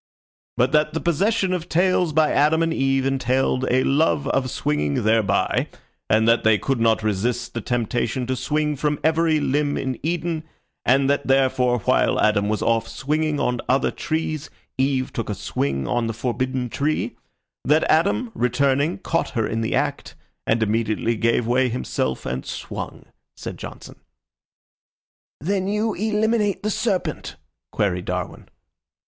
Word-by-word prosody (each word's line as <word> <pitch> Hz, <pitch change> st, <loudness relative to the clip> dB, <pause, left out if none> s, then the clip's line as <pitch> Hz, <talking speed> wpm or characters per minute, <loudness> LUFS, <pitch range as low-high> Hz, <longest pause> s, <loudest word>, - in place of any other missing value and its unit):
"But 125 Hz, +2 st, +3 dB
that 150 Hz, +1 st, +2 dB
the -, -, +1 dB
possession 190 Hz, +4 st, +1 dB
of 180 Hz, -1 st, -4 dB
tails 180 Hz, 0 st, +2 dB
by 155 Hz, 0 st, +3 dB
Adam 155 Hz, +3 st, +3 dB
and 165 Hz, 0 st, 0 dB
Eve 135 Hz, -2 st, +1 dB
entailed 130 Hz, 0 st, +1 dB
a 130 Hz, +1 st, +3 dB
love 145 Hz, 0 st, +2 dB
of 130 Hz, -1 st, 0 dB
swinging 75 Hz, -6 st, -1 dB
thereby, 110 Hz, -2 st, +2 dB, 0.4 s
and 110 Hz, +1 st, +3 dB
that 115 Hz, 0 st, +4 dB
they 110 Hz, -1 st, +5 dB
could 135 Hz, +3 st, -1 dB
not 115 Hz, -1 st, +2 dB
resist 115 Hz, +4 st, -1 dB
the 115 Hz, -, -3 dB
temptation 120 Hz, +2 st, -1 dB
to 130 Hz, +1 st, -1 dB
swing 150 Hz, +4 st, -1 dB
from 150 Hz, +1 st, -1 dB
every 160 Hz, 0 st, +3 dB
limb 145 Hz, +1 st, 0 dB
in 130 Hz, -2 st, -3 dB
Eden, 165 Hz, 0 st, -2 dB, 0.4 s
and 135 Hz, +2 st, +4 dB
that 140 Hz, +1 st, 0 dB
therefore, 130 Hz, -2 st, +3 dB
while -, -, +2 dB
Adam 105 Hz, -1 st, +2 dB
was 110 Hz, -, -1 dB
off 115 Hz, -1 st, +1 dB
swinging 150 Hz, +1 st, -1 dB
on 125 Hz, -1 st, 0 dB
other 130 Hz, +1 st, +2 dB
trees, 155 Hz, -2 st, -3 dB, 0.3 s
Eve 130 Hz, -1 st, 0 dB
took 115 Hz, -, -3 dB
a 105 Hz, -, -2 dB
swing 70 Hz, -6 st, -2 dB
on 120 Hz, -1 st, 0 dB
the 115 Hz, -, -2 dB
forbidden 125 Hz, +2 st, -2 dB
tree; 145 Hz, +6 st, -1 dB, 0.5 s
that 150 Hz, +3 st, +3 dB
Adam, 200 Hz, +9 st, +2 dB
returning, 140 Hz, +6 st, +1 dB
caught 165 Hz, -3 st, -1 dB
her 110 Hz, -2 st, -1 dB
in 115 Hz, +1 st, -2 dB
the 110 Hz, -, -1 dB
act, -, -, -2 dB, 0.3 s
and 115 Hz, 0 st, +2 dB
immediately 110 Hz, +1 st, 0 dB
gave 115 Hz, +1 st, +1 dB
way 125 Hz, +2 st, +2 dB
himself 90 Hz, -, -2 dB
and 65 Hz, 0 st, -3 dB
swung," -, -, -6 dB, 0.3 s
said -, -, -6 dB
Johnson. -, -, -10 dB, 1.4 s
"Then 190 Hz, +5 st, -1 dB
you 210 Hz, +2 st, 0 dB
eliminate 215 Hz, 0 st, 0 dB
the 215 Hz, -, 0 dB
serpent?" 215 Hz, -3 st, -2 dB, 0.4 s
queried 90 Hz, -3 st, -1 dB
Darwin. 90 Hz, -1 st, -4 dB
130 Hz, 155 wpm, -22 LUFS, 115-155 Hz, 1.4 s, they